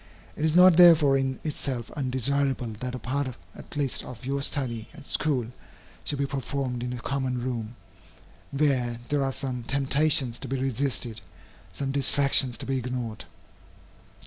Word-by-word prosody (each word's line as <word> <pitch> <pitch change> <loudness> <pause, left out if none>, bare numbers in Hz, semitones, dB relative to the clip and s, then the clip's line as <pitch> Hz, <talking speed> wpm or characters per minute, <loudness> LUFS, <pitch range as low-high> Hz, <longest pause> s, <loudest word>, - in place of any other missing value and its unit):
It - - -4
is 160 0 +2
not 180 -1 +7
therefore 160 -6 +7
in 135 -1 -1
itself 135 -6 -4
undesirable 130 -2 0
that 125 +1 -4
a - - -3
part 130 +3 -2 0.3
at - - -12
least 140 -3 0
of 125 0 -10
your 140 +1 -1
study 125 -6 -2
at - - -12
school 135 -6 0 0.6
should 145 - -1
be 140 - 0
performed 135 -2 -3
in 125 0 -3
a 125 - -5
common 130 0 -2
room, 120 -2 -4 0.7
where 130 -5 +1
there 145 -1 +1
are 135 - 0
some 130 -2 -4
temptations 140 0 +2
to - - -6
be 135 +1 -2
resisted, 130 -3 -1 0.5
some 135 -1 -3
distractions 135 -2 +3
to - - -5
be 135 -1 -1
ignored. 120 -3 -4
135 Hz, 155 wpm, -26 LUFS, 125-140 Hz, 0.7 s, not